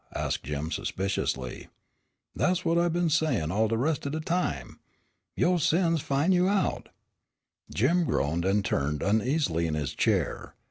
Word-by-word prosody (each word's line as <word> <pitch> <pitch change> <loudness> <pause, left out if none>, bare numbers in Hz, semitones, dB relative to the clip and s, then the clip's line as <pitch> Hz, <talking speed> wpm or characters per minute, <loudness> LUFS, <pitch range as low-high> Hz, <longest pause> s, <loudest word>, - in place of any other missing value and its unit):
asked - - -1
Jim 75 +3 -3
suspiciously. 80 -10 -3 0.7
"Des' 185 0 +1
what 165 +1 +3
it 175 0 +2
been 175 +1 +1
sayin' 155 - +1
all 110 +4 +2
de 115 +1 0
res' 145 +5 +1
o' 140 - -2
de 155 +2 -3
time. 155 - -2 0.6
'Yo' 180 +1 +2
sins 165 0 +2
will 135 - +1
fin' 155 +7 +3
you 180 0 +3
out'" 200 -1 0 0.8
Jim 170 - +2
groaned 80 - 0
and 100 +2 +1
turned 75 +1 -1
uneasily 110 - +1
in 80 - -2
his 75 -4 -3
chair. - - -1
135 Hz, 155 wpm, -28 LUFS, -, 0.8 s, what